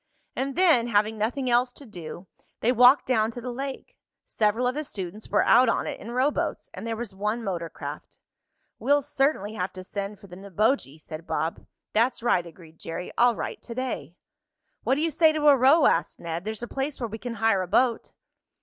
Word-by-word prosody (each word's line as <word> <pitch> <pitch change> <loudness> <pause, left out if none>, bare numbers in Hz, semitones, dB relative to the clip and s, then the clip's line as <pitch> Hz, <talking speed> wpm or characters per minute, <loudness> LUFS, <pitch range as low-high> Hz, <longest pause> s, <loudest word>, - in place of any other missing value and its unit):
And 270 +1 -2
then, 325 -10 +4
having 215 0 +1
nothing 250 +5 -1
else 245 +1 +3
to 280 - -12
do, 175 -4 -9 0.4
they 235 - +3
walked 250 +2 +6
down 220 -4 +2
to 235 - -7
the 250 +1 -5
lake. 275 - -6 0.3
Several 220 +3 +1
of 250 - +1
the 300 +3 -3
students 205 - -7
were - - +3
out 245 +1 +6
on - - 0
it - - -5
in 230 - -9
rowboats, 260 - -1
and - - -7
there 225 - -2
was 225 -3 -6
one 210 +4 -2
motor 175 -5 -3
craft. - - -8 0.6
"We'll 285 +1 +3
certainly 270 -7 0
have 185 -2 -3
to 185 - -8
send 200 +2 -5
for - - -15
the 180 -2 -11
Neboje," 195 - -1
said 155 +2 -9
Bob. 160 0 -3 0.3
"That's 235 +2 +1
right," 180 -8 +2
agreed 165 -1 -15
Jerry. 180 +2 -6
"I'll 240 0 +4
write - - -5
to 235 - -9
day." 255 -9 -4 0.7
"What 260 +4 +1
do 295 - -1
you 325 0 +1
say 315 +1 +4
to 300 -1 +1
a 285 - +8
row," 275 +5 +5
asked 165 - +1
Ned. 170 +2 -5
"There's 220 +1 -4
a - - -3
place 275 +3 -3
where 240 - -2
we 220 +1 -7
can 240 0 -5
hire 225 -4 +2
a 185 - -3
boat." 240 +4 +1
230 Hz, 210 wpm, -26 LUFS, 195-260 Hz, 0.7 s, a